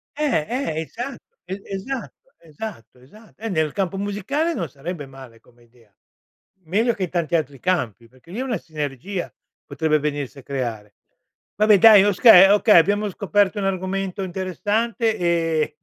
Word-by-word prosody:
Eh, 280 - 0
eh, 235 - -2
esa 240 - -6 0.3
e 190 +2 -6
esatto, 265 - -7
esatto, 150 - -10
esa 210 - -19
eh, 225 +1 -5
nel 160 -5 0
campo 195 0 -2
musicale 210 - -2
non - - -4
sarebbe 150 +1 -7
male 130 -4 -14
come 120 0 -25
idea. 115 -3 -26 0.7
Meglio 225 +8 +1
che 195 - -4
in 175 - -3
tanti 170 -1 -1
altri 145 -4 -2
campi, 120 - -2
perché 130 +8 -19
lì 210 - -7
è - - -1
una 240 -6 -2
sinergia 155 +4 -5 0.3
potrebbe 155 -1 0
venirsi 145 -2 -4
a - - -14
creare. 115 -7 -5 0.6
Vabbè 210 0 +5
dai 210 -2 +8
okay, 200 -1 +7
okay, 210 -3 +5
abbiamo 205 +4 +1
scoperto 205 +1 0
un 195 - -2
argomento 195 +1 -2
interessante 205 +5 -1
e 165 -3 0
185 Hz, 155 wpm, -22 LUFS, 150-210 Hz, 0.7 s, dai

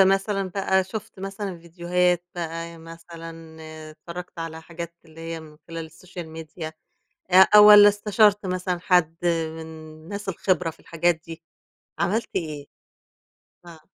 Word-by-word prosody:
مثلًا 195 0 +3
بقى 190 -1 +2
شُفت 190 0 -8
مثلًا 195 -2 -5
فيديوهات 175 +1 0
بقى، 165 -1 -5
مثلًا 165 -1 -11 0.3
اتفرّجت 170 +2 -9
على 160 -1 -6
حاجات 170 0 -7
اللي 160 0 -14
هي 165 0 -5
من 155 -1 -14
خلال 165 -1 -5
السوشيال 175 +1 -10
ميديا 160 0 -7 0.6
أ 190 +3 +8
والَّا 210 0 +10
استشرت 205 0 +3
مثلًا 180 -1 -2
حد 175 -3 +3
من 165 -2 0
الناس 160 +5 -9
الخبرة 180 -3 0
في 160 - -19
الحاجات 170 0 0
دي 165 0 -9 0.6
عملت 215 +6 0
إيه؟ 150 -4 -3 1.0
آه. 170 -2 -12
170 Hz, 130 wpm, -24 LUFS, 165-190 Hz, 1.0 s, والَّا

